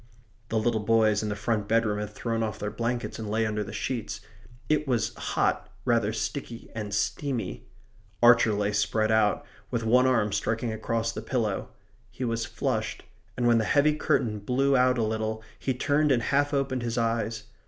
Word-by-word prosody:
The 110 - 0
little 110 0 +1
boys 110 -1 +3
in 105 - -2
the 105 - -2
front 105 0 -1
bedroom 110 -2 +2
had 105 -1 -3
thrown 115 +2 -3
off 110 -2 -2
their 105 0 -3
blankets 120 0 -3
and 110 -2 -5
lay 110 +1 +1
under 105 -1 -1
the 105 - -8
sheets. 115 +1 -3 0.5
It 150 -1 +1
was 120 -5 0
hot; - - -1 0.2
rather 115 -4 +2
sticky 115 +2 -5
and 105 -3 -5
steamy. 100 - -2 0.6
Archer 115 -2 +6
lay 100 0 0
spread 110 +1 +1
out, 110 -2 +2 0.2
with 115 -1 -2
one 125 +3 +4
arm 115 -5 +2
striking 110 +3 -1
across 115 +1 -1
the 110 - -6
pillow. 110 -4 -1 0.4
He 125 +5 -5
was 115 -1 -1
flushed; 120 - -2 0.3
and 125 - 0
when 120 -1 +5
the - - +1
heavy 145 +6 +3
curtain 110 -7 0
blew 135 +6 +1
out 125 0 +4
a 115 - +1
little 110 0 -2 0.2
he 130 - -1
turned 145 +3 +2
and 120 -3 +2
half 145 +2 +2
opened 135 -3 0
his 120 0 -3
eyes. 115 -1 -1
115 Hz, 185 wpm, -27 LUFS, 105-125 Hz, 0.6 s, Archer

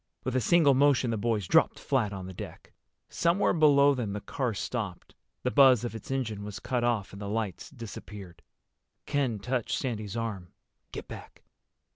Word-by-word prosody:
With 130 0 -2
a 130 - +2
single 150 +3 +5
motion 135 -3 +3
the - - 0
boys 110 -2 0
dropped - - +4
flat 120 -7 0
on 95 -2 -6
the 95 - -8
deck. - - -10 0.3
Somewhere 170 +4 +2
below 145 -3 +5
them 115 -7 -3
the 105 - -3
car 115 +3 -3
stopped. 100 -5 -4 0.3
The 125 - 0
buzz 130 -4 +6
of 120 - -3
its 115 +7 -9
engine 115 -6 -2
was 105 -1 -6
cut 125 -2 -2
off 115 -6 0
and 100 - -9
the 100 - -4
lights 105 -4 -3
disappeared. 100 -8 -10 0.6
Ken 135 -6 0
touched 125 +3 -2
Sandy's 110 -4 -3
arm. 105 -6 -4 0.4
"Get - - -7
back." - - -11
115 Hz, 175 wpm, -28 LUFS, 100-135 Hz, 0.6 s, buzz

